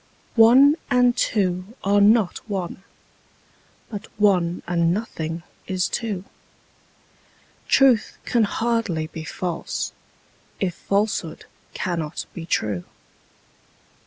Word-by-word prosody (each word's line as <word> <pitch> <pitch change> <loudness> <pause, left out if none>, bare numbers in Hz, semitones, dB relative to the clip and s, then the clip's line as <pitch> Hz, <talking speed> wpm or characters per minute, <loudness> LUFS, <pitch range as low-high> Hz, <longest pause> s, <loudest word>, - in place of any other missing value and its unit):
One 265 +7 +7
and 245 -1 +4
two 190 -3 -1
are 200 +1 +3
not 210 -2 +4
one: 190 -1 -4 1.0
but 205 -3 -7
one 180 -4 +2
and 170 -1 +2
nothing 170 -5 -3 0.2
is 185 -1 0
two: 205 -5 -3 1.4
Truth 260 -5 +4
can 235 -3 +2
hardly 220 -7 -1
be 160 0 -8
false, 175 +1 -4 0.7
if 185 -4 0
falsehood 200 -3 -1 0.3
cannot 165 -3 -3
be 165 -1 -7
true. 105 - -1
195 Hz, 95 wpm, -23 LUFS, 170-225 Hz, 1.4 s, One